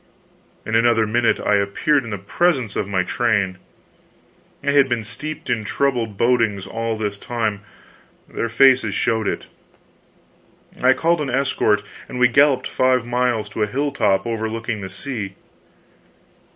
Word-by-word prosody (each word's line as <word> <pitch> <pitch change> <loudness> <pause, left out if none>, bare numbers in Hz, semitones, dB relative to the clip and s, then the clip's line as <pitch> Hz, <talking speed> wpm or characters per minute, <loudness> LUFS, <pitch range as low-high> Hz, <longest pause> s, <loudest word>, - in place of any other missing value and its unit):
In 110 - -4
another 115 0 +3
minute 115 +2 +1
I 105 - +2
appeared 115 +9 +1
in 115 - -7
the 100 - -3
presence 125 - 0
of 100 - -1
my 95 -2 0
train. 100 -3 0 1.0
They 140 0 +1
had 140 -2 +4
been 120 -2 -1
steeped 150 +8 -7
in 120 -4 -1
troubled 115 -3 -1
bodings 115 -5 +1
all 115 0 -3
this 105 -2 -3
time 110 -4 -2 0.7
their 115 - -3
faces 125 -2 +4
showed 110 -3 0
it. - - -3 1.4
I 130 +1 +5
called 165 +3 +1
an 145 - -2
escort 125 -5 +1 0.3
and - - -6
we 125 0 +4
galloped 140 0 +4
five 130 -2 +1
miles 120 -3 0
to 105 - -5
a 105 - +2
hilltop 115 -6 0
overlooking 115 -1 -3
the 95 - -6
sea. 100 -1 -6
115 Hz, 145 wpm, -21 LUFS, 105-130 Hz, 1.4 s, I